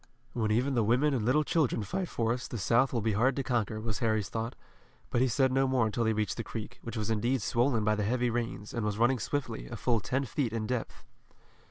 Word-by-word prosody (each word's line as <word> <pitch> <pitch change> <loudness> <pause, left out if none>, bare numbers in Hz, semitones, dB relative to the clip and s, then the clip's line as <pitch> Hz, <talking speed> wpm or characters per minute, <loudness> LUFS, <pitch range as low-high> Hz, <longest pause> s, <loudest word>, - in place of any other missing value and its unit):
"When 110 -3 0
even 125 +6 +2
the 120 - +2
women 125 +7 +3
and 120 -5 0
little 130 +7 +3
children 145 -8 +1
fight 185 - -3
for 115 0 0
us, 125 0 -5
the 120 - -5
South 115 +6 +3
will 115 -4 -1
be 110 - +1
hard 125 +6 +2
to 135 - -1
conquer," 115 -4 -1
was 110 -2 -3
Harry's 110 -5 0
thought, 115 +1 -3 0.6
but 120 - +2
he 130 - +4
said 130 +2 +2
no 135 +1 +3
more 130 -3 +2
until 110 +2 0
they 110 - +2
reached 105 -1 -1
the 115 - -2
creek, 110 -1 -7
which 115 0 -6
was 110 +1 -1
indeed 120 +2 +1
swollen 120 -1 +2
by 105 0 +3
the 105 - -1
heavy 120 +3 +1
rains, 120 -2 -3
and 115 - -2
was 105 -1 -1
running 120 +2 +3
swiftly, 125 -1 -3
a 120 - -6
full 115 0 +1
ten 130 +6 -1
feet 125 -2 -2
in 110 -1 -2
depth. 125 0 -4
115 Hz, 245 wpm, -30 LUFS, 110-130 Hz, 0.6 s, he